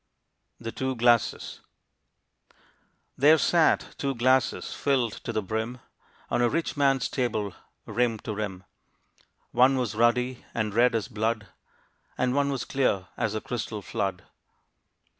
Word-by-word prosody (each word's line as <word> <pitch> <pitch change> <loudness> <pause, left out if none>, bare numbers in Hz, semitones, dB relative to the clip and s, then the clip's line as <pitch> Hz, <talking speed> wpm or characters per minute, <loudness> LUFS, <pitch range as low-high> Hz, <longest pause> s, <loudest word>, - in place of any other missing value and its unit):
THE 115 -1 -5
TWO 130 +2 -2
GLASSES. 120 -1 +2 1.6
There 150 +4 +7
sat 165 0 +2
two 140 -3 -1
glasses 130 +1 +2
filled 130 -5 +1
to - - -3
the 110 - -1
brim, 110 +5 -3 0.5
On - - +2
a 120 - +4
rich 165 +4 -1
man's 135 -3 +2
table, 110 -7 -2 0.3
rim 120 -2 0
to 110 - -4
rim. 100 -3 -4 0.9
One 130 +2 +5
was 125 -5 -1
ruddy 120 +3 +1
and 110 -3 -1
red 120 +2 +4
as 110 - -1
blood, 110 -3 -2 0.7
And 125 0 +1
one 140 0 +2
was 135 -4 -3
clear 100 -9 0
as 110 - -1
the 110 - -2
crystal 110 -3 -4
flood. 95 -1 -3
120 Hz, 135 wpm, -27 LUFS, 110-130 Hz, 1.6 s, There